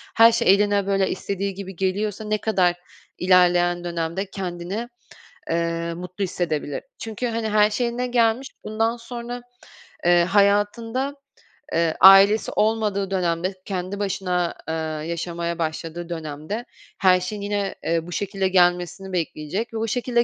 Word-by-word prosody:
her 230 +1 +8
şey 210 -4 +4
eline, 200 -1 +2
böyle, 195 -1 +2
istediği 200 +1 -3
gibi 190 -1 -8
geliyorsa 200 +3 -1
ne 215 0 0
kadar 185 -5 +2 0.4
ilerleyen 175 -1 +3
dönemde 170 +3 -3
kendini, 190 +5 -5 0.6
eee, 170 0 -1
mutlu 180 +3 -5
hissedebilir? 155 -6 -2
Çünkü, 225 +2 -4
hani, 225 -1 -2
her 210 0 +4
şey 240 +3 0
eline 245 +1 -2
gelmiş, 240 +2 +1
bundan 225 +2 0
sonra, 240 +1 -7 0.6
eee, 175 0 +5
hayatında, 205 +8 +1 0.6
eee, 165 -1 +1
ailesi 195 +3 +7
olmadığı 210 -3 0
dönemde 180 0 0
kendi 190 +1 -4
başına, 180 -3 -1
eee, 160 - -2 0.4
yaşamaya 170 0 -3
başladığı 165 +1 -4
dönemde 160 +7 -5 0.3
her 185 -2 +5
şeyin 200 +3 -5
yine, 200 -1 -2
eee, 165 0 -1
bu - - -8
şekilde 195 0 -1
gelmesini 180 0 +1
bekleyecek 175 +6 -3
ve 225 - -3
o 225 +1 -1
şekilde 240 +1 +1
195 Hz, 135 wpm, -23 LUFS, 175-215 Hz, 0.6 s, her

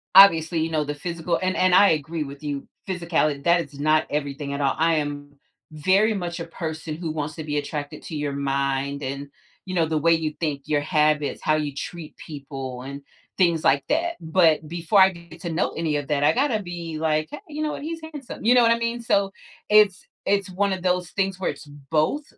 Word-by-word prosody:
obviously, 170 -4 +7
you 160 - 0
know, 155 -1 +1
the 145 0 -3
physical 170 +2 -2
and 185 0 0
and 185 -1 +3
I 200 +2 +7
agree 155 +1 -1
with 140 +1 -10
you, 145 -2 -4 0.2
physicality; 165 -6 0
that 170 0 +4
is 145 -2 -10
not 155 +1 +3
everything 145 -1 -3
at 140 - -3
all, 135 - +1
I 165 +2 +3
am 145 -1 -4 0.4
very 190 +8 +3
much 175 -4 -4
a 170 - -4
person 160 -2 -5
who 165 -1 -4
wants 155 0 -4
to 160 - -6
be 150 -1 -2
attracted 145 0 -4
to 160 - -7
your 145 -1 -2
mind 140 0 -1
and, 140 +1 -5 0.4
you 185 -1 -5
know, 165 -2 +3
the 155 0 -1
way 165 +3 +4
you 160 -2 -1
think, 150 -4 -2
your 150 -1 +1
habits, 150 -1 +1
how 155 - +3
you 150 -2 -2
treat 160 +2 -7
people, 135 -4 -7
and 140 +1 -7 0.4
things 170 -4 +3
like 140 0 +3
that, 335 +3 +1
but 160 -2 +3
before 175 +4 +2
I 190 - +8
get 170 -1 -13
to 170 - -4
know 165 - 0
any 160 -2 -1
of 145 -1 -2
that, 145 -1 +1
I - - +5
gotta 245 -4 +1
be 170 -3 -6
like, 155 -1 0
"Hey, 295 - -6
you 305 +1 -4
know 305 - -1
what, - - -6
he's 325 +1 -5
handsome." 275 -7 -8
You 240 - +6
know 250 - +6
what 230 - +5
I 230 - +4
mean? 235 +1 -2
So 200 -4 +1 0.4
it's 210 -3 +5 0.2
it's 200 -1 +1
one 200 +2 +1
of 185 - -4
those 180 -1 +1
things 195 -1 -1
where 190 - 0
it's - - -7
both. 150 - -1
160 Hz, 225 wpm, -24 LUFS, 145-185 Hz, 0.4 s, I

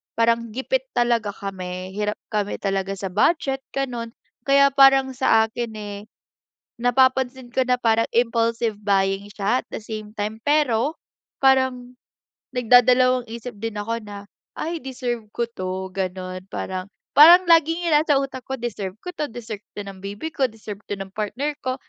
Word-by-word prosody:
parang 230 -1 +1
gipit - - -1
talaga 235 -4 +1
kami, 185 -2 -6
hirap 210 +2 -2 0.2
kami 205 -1 -1
talaga 195 0 -1
sa 195 -1 -5
budget, 270 - +2 0.2
ganun. 240 -4 -3 0.3
Kaya 280 0 +6
parang 270 -1 +6
sakin, 225 -2 +1
eh, 205 -1 -6 0.8
napapansin 260 0 +2
ko 260 +1 +1
na 250 0 +1
parang 225 0 +3
impulsive 230 -2 +1
buying 195 0 +1
siya, 210 +5 0
at - - -64
the - - -4
same 215 -1 -7
time. 210 +1 -3
Pero 290 -1 +1 0.4
parang 260 -2 +2 0.5
nagdadalawang 250 +1 +4
isip 235 +1 -7
din 215 +1 -5
ako 230 +2 -3
na, 205 -1 -9 0.4
"Ay 330 0 -3
deserve 245 -4 -4
ko 235 +1 -2
'to." 185 -3 -5
ganun. 185 -1 -4
Parang 185 0 -4 0.3
parang 345 +4 +10
laging 330 +1 +4
yung - - +4
nasa 300 -1 +2
utak 270 -2 -4
ko, 265 - -3
"Deserve 210 -6 -5
ko 360 - -4
to, 300 - -2
deserve 220 -3 -7 0.2
to 205 - -3
ng 195 -1 -9
baby 205 +11 -5
ko, 270 -2 +2
deserve 215 -2 -9
to - - -2
ng 195 0 -7
partner 240 +9 -3
ko, 255 - +1
230 Hz, 155 wpm, -23 LUFS, 205-260 Hz, 0.8 s, parang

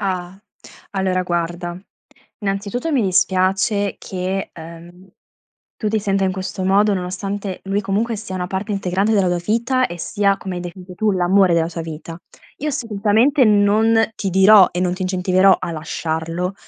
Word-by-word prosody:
Ah, 185 -2 -3 0.5
allora 190 -2 0
guarda, 175 0 -3 0.6
innanzitutto 205 +9 -2
mi 265 -5 +2
dispiace 190 +2 +1
che, 190 +1 -4
ehm, 170 +3 -12 0.7
tu 215 - -2
ti 220 +1 +1
senta 195 -1 0
in 185 - 0
questo 185 0 -4
modo, 200 +2 +3
nonostante 190 +1 -4
lui, 195 +1 -1
comunque, 210 +4 -1
sia 205 -3 -7
una 180 -1 -3
parte 195 +3 -3
integrante 195 +2 0
della 195 -4 +3
tua 175 - 0
vita 235 +6 +1
e 175 - -8
sia, 200 +3 +1
come 190 -1 -6
hai - - -4
definito 180 +1 -9
tu, 215 +3 +1
l'amore 185 0 +3
della 165 0 +1
tua 165 -1 -5
vita. 165 +1 -8 0.4
Io 300 - -3
assolutamente 230 +3 +2
non 215 +2 +3
ti 195 - -2
dirò 190 +1 +7
e 180 - -2
non 180 -1 0
ti 185 - -5
incentiverò 185 +1 +3
a 170 - -4
lasciarlo, 165 +3 -3
190 Hz, 160 wpm, -20 LUFS, 180-205 Hz, 0.7 s, dirò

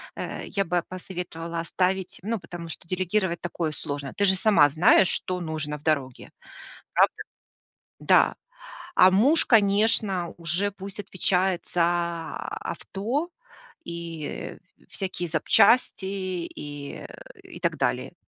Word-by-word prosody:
э, - - -5
я 200 -1 0
бы 175 0 0
посоветовала 175 -2 -6
оставить, 185 +2 -1
ну, 220 +3 -2
потому 175 -2 -8
что 165 +2 -6
делегировать 185 0 0
такое 170 -2 -2
сложно. 145 -3 -5
Ты 205 - +2
же 190 -1 +5
сама 200 -8 +5
знаешь, 170 +5 +5
что 185 0 0
нужно 155 -2 -3
в 150 - -20
дороге. 140 -5 -1 0.7
Правда? - - +3 0.8
Да. - - +4 0.6
А 185 0 +7
муж, 270 - +4
конечно, 200 -4 +3
уже 175 +5 0
пусть 195 +1 -9
отвечает 185 -2 0
за 170 -1 0
авто 200 - -4 0.5
и, 170 -2 -6
э, - - -6 0.3
всякие 185 -2 -4
запчасти, 190 +7 +4
и, 175 -7 -5
э, - - -7 0.4
и - - -11
так - - -1
далее. - - -1
180 Hz, 125 wpm, -26 LUFS, 165-195 Hz, 0.8 s, А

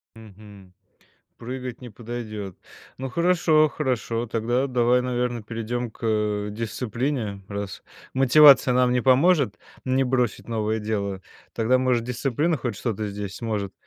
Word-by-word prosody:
Мгм. 105 -3 -15 0.6
Прыгать 125 0 -6
не 125 - -8
подойдет, 110 -4 -7 0.4
ну 130 0 -5
хорошо 165 0 +3
хорошо, 125 -5 -2
тогда 120 +4 0
давай, 125 -1 +2
наверное, 125 -1 -2
перейдем 115 +2 -4
к, - - -22
э, 105 -2 0
дисциплине 115 0 -3
раз 100 -2 -6 0.3
мотивация 135 0 +7
нам 125 0 +3
не 125 - +2
поможет, 135 - +3 0.3
не 130 +1 +2
бросить 125 -2 -1
новое 110 -1 -1
дело, 100 -3 -3 0.3
тогда 115 +3 +2
может 125 -2 +1
дисциплина 135 +6 0
хоть 120 -4 -3
что 115 0 -2
то 105 +2 -4
здесь 100 -2 -6
сможет 105 -4 -3
120 Hz, 135 wpm, -24 LUFS, 105-130 Hz, 0.6 s, мотивация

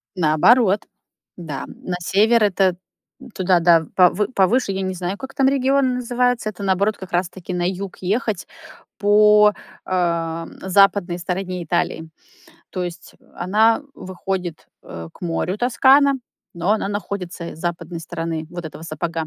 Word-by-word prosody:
Наоборот, 190 +6 +4 0.5
да, 155 -6 -6
м. - - -11
На 180 - -3
север- 215 +6 +3
это 190 -2 +2 0.6
туда, 185 -2 +3
да, 165 -1 +5
в 160 - -11
повы 185 +3 +4
повыше. 200 +3 +2
Я 190 0 -3
не 185 0 -2
знаю, 185 +2 -4
как 265 0 -9
там 270 -1 +2
регион 270 -1 +2
называется. 245 -2 0
Это, 200 -1 -8
наоборот, 200 +2 +1
как 190 0 -10
раз-таки 180 +1 -3
на 175 0 0
юг 190 0 -5
ехать 205 0 -1 0.5
по, 210 0 +5 0.3
э, - - -10
м, 165 -2 -1
западной 190 -2 +3
стороне 180 0 -3
Италии. 160 -1 -2 0.6
То 185 - -3
есть 175 0 -8 0.2
она 215 +7 +2
выходит, 185 -2 -5 0.2
э, 80 0 -8
к - - -20
морю, 180 +3 -2
Тоскана, 270 +3 +4 0.4
но 170 +3 -1
она 215 -2 -1
находится 190 -4 -5
с - - -15
западной 170 0 -4
стороны 165 -1 -4
вот 175 -1 -7
этого 160 0 -8
сапога. 165 -1 -4
185 Hz, 150 wpm, -21 LUFS, 175-210 Hz, 0.6 s, да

